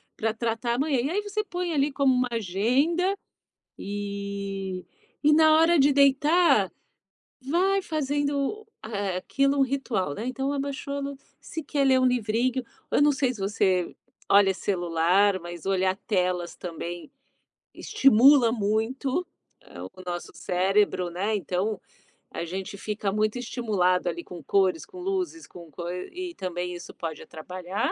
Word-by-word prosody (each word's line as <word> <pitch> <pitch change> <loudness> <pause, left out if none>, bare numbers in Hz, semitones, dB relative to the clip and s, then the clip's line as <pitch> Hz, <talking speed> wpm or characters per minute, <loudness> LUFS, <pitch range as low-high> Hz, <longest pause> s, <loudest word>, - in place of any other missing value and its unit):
pra 220 0 0
tratar 230 +1 -1
amanhã. 275 -1 +1
E 275 - -1
aí 405 +5 0
você 425 +1 -2
põe 355 -3 -3
ali 285 0 +1
como 270 -2 +3
uma 250 0 +2
agenda. 255 - +1 0.6
E 200 -2 -4 0.4
e, 300 - +6
na 315 0 +6
hora 330 +1 +5
de 280 +1 +5
deitar, 280 - +4 0.7
vai 365 +9 +1
fazendo, 290 +5 -1 0.2
eh, 200 -4 -2
aquilo 275 +7 +1
um - - +5
ritual, 255 - -1
né? 225 - -5
Então 270 +2 -2
abaixou 280 0 -3
a - - -2
luz 280 -1 -5 0.2
se 320 - -6
quer 280 -1 0
ler 260 -1 +5
um - - +3
livrinho 245 +2 +1 0.3
eu - - +2
não 290 0 +5
sei 265 -3 +1
se 215 - -10
você 190 -3 +1 0.3
olha 195 -1 +6
celular. 185 +1 +2
Mas 175 -1 -8
olhar 190 -1 +1
telas 180 -4 0
também 175 - -6 0.6
estimula 265 -1 +5
muito, 240 - -1 0.7
o 185 - -11
nosso 175 -1 -5
cérebro, 185 0 +1
né? 200 +5 -1
Então 195 +2 -2 0.5
a 170 - -4
gente 190 +3 -5
fica 210 -1 -3
muito 215 +3 0
estimulado 205 -8 0
ali 170 0 -5
com 175 -4 -10
cores, 185 -1 +2
com 365 - -12
luzes, 365 -3 -3
com 170 -3 -13
cor. 170 +3 -5 0.2
E 355 -1 -6
também 180 -1 -4
isso 175 - -9
pode 160 -3 -6
atrapalhar. 185 +5 -4
220 Hz, 145 wpm, -26 LUFS, 185-280 Hz, 0.7 s, e